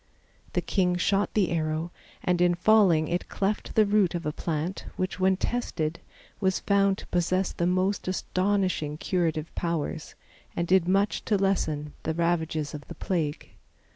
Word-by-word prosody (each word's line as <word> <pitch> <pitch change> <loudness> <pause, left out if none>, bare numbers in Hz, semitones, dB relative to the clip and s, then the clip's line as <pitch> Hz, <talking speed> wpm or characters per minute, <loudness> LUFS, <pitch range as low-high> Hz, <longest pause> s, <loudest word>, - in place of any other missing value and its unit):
The - - +1
king 180 -3 +1
shot 195 +3 +1
the 200 -5 +2
arrow 160 0 -1 0.3
and 180 -1 +1
in 175 0 +4
falling 180 -5 +4
it 175 +1 -2
cleft 205 +2 -2
the 215 - +6
root 200 -4 +2
of 170 - -4
a 150 - 0
plant 165 +4 -3
which, 185 0 -3
when 190 0 +3
tested, 170 -9 -2 0.4
was 190 -2 +1
found 200 -1 +2
to - - -10
possess 180 +2 +1
the 170 - -1
most 185 +2 0
astonishing 185 -4 0
curative 165 -3 -1
powers, 165 -2 -3 0.4
and 170 - -1
did 185 -1 +4
much 195 +3 +1
to 210 - +2
lessen 155 -7 0
the 160 - -2
ravages 160 -3 0
of 150 -1 -8
the 170 - -8
plague. 155 -4 -2
180 Hz, 160 wpm, -27 LUFS, 160-195 Hz, 0.4 s, the